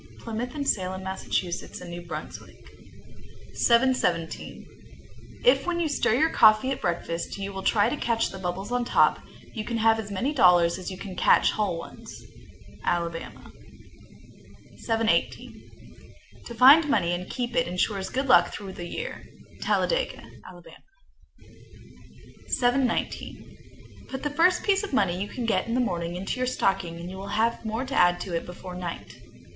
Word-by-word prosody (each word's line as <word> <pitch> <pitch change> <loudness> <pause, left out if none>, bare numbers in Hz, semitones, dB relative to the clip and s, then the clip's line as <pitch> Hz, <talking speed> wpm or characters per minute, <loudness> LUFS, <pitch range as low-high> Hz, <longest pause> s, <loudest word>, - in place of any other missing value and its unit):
Plymouth 235 +3 -5
and 285 -2 -3
Salem, 190 -1 -1
Mass., 190 0 -6
and 175 0 -3
New 175 0 -6
Brunswick. 175 - -9 0.9
717. 235 -9 +1 0.8
If - - +4
when 345 -1 0
you 335 - +1
stir 285 -6 +1
your 315 +5 +2
coffee 220 +4 +5
at 270 - -3
breakfast 170 0 -3
you 200 0 -5
will 195 - -5
try 205 +1 +3
to 250 - -1
catch 230 -5 0
the 190 - -8
bubbles 190 +4 -4
on 245 0 0
top, - - +3 0.3
you 220 - -4
can 230 +2 -3
have 225 0 +3
as 210 -2 -6
many 240 +9 -2
dollars 180 - +4
as 185 - -6
you 185 - -7
can 190 -1 -8
catch - - +4
whole 205 -5 -1
ones. 165 - -10 0.6
Alabama. 170 -1 -3 1.3
718. 225 -1 -1 0.8
To 235 - -8
find 285 +6 +7
money 175 -11 +2
and 180 +1 -5
keep 245 -1 -4
it 250 - +2
insures 190 +2 -1
good 265 +2 -2
luck 260 - +5
through 195 -2 -7
the 175 -1 -7
year. 480 - -6 0.4
Talladega, - - 0 0.3
Ala. 175 -1 -14 1.8
719. 245 0 -3
Put 265 0 -6
the 295 - -1
first 355 +4 +3
piece 395 -1 +2
of 410 -7 -6
money 185 -9 +1
you 235 +4 -5
get 225 - 0
in 230 - -1
the - - +1
morning 175 -7 -2
into 195 +7 -4
your 255 - 0
stocking, 175 -8 -1
and 170 - -7
you 190 - -8
will 195 +1 -7
have 230 +1 +1
more 225 +3 -3
to 270 - -6
add 175 0 +4
to 180 -3 -4
it 165 - -3
before 180 +1 -9
night. 180 -1 -7
215 Hz, 160 wpm, -26 LUFS, 180-255 Hz, 1.8 s, find